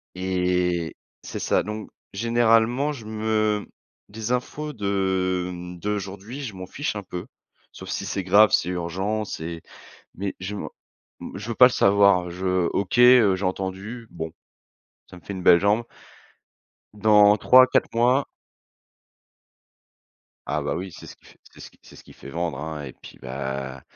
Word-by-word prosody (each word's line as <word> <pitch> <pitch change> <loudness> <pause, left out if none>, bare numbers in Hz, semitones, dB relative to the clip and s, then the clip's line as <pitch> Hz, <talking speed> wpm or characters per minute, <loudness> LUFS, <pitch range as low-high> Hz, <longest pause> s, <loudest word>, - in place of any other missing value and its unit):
et 90 -2 -1 0.3
c'est - - -6
ça - - +1
donc 105 +2 -6 0.2
généralement 115 +5 +2
je 120 -7 -8
me 110 -1 0 0.4
des 110 +2 -5
infos 150 +4 -3
de, 95 -3 -1
mmh, 90 0 -8
d'aujourd'hui 105 +6 -5
je 110 -7 -6
m'en 95 - -7
fiche 145 -2 -4
un 100 - -6
peu 90 -1 -7 0.5
sauf - - -11
si 100 - -3
c'est 95 0 -3
grave, 100 +3 +5
c'est 90 - +2
urgent 95 +5 -2
c'est 85 -3 -6 0.5
mais 100 +1 -4
je 95 +3 -5
m'en - - -5 0.7
je 105 +3 -7
veux 115 - -2
pas 125 - +9
le 125 - +2
savoir 100 -4 +4
je 90 0 0
OK, 100 +4 -1
heu, 120 -6 +7
j'ai 95 - -5
entendu 95 +5 -4
bon, 80 -1 -6 0.8
ça - - -12
me 90 - -15
fait - - -7
une 95 - -6
belle 85 - +7
jambe. 105 +4 +2 1.1
dans 105 -1 +5
3-4 130 +2 +5
mois 125 +4 +3 2.2
Ah 75 +2 -1
bah 70 - -2
oui 95 0 -5
c'est - - -12 0.4
c'est - - -19
ce - - -10
c'est - - -16
ce - - -15
qui - - -16
fait - - -12
vendre 85 -2 -3
hein 75 -1 -5
et 65 - -9
puis - - -15
bah 65 0 -5
100 Hz, 155 wpm, -24 LUFS, 90-110 Hz, 2.2 s, pas